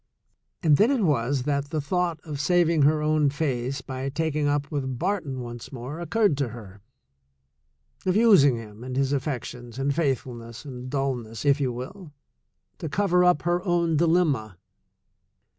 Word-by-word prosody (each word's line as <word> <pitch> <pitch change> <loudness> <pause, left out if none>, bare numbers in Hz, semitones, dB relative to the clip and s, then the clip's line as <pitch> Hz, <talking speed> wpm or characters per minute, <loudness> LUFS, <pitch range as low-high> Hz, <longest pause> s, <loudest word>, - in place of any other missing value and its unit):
And 150 -3 +5
then 220 - +5
it 265 -6 +1
was 135 -4 +1
that 140 0 0
the 155 0 -2
thought 170 +2 -1
of 150 -3 -6
saving 170 +1 +3
her 150 +2 +3
own 155 -1 +3
face 135 -2 -2
by 130 +1 -4
taking 150 0 -1
up 145 0 -1
with 130 -4 -2
Barton 165 -7 -2
once 120 -1 -8
more 135 +5 -6
oc 170 - -6
curred 210 -9 +3
to 140 -3 0
her, 105 -4 -11 1.3
of 185 - +2
using 200 - +6
him 110 0 -9
and 130 0 -5
his 135 0 +1
affections 125 -3 -4
and 135 +1 0
faith 140 -5 +1
fulness 120 0 -10
and 130 -2 -7
dulness, 125 -6 -3
if 140 0 +3
you 130 -2 +1
will, 145 +8 -8 0.7
to 160 - -4
cover 180 +1 +2
up 180 -4 +3
her 175 +1 0
own 170 -3 +1
dilemma. 150 - +1
140 Hz, 165 wpm, -25 LUFS, 130-165 Hz, 1.3 s, using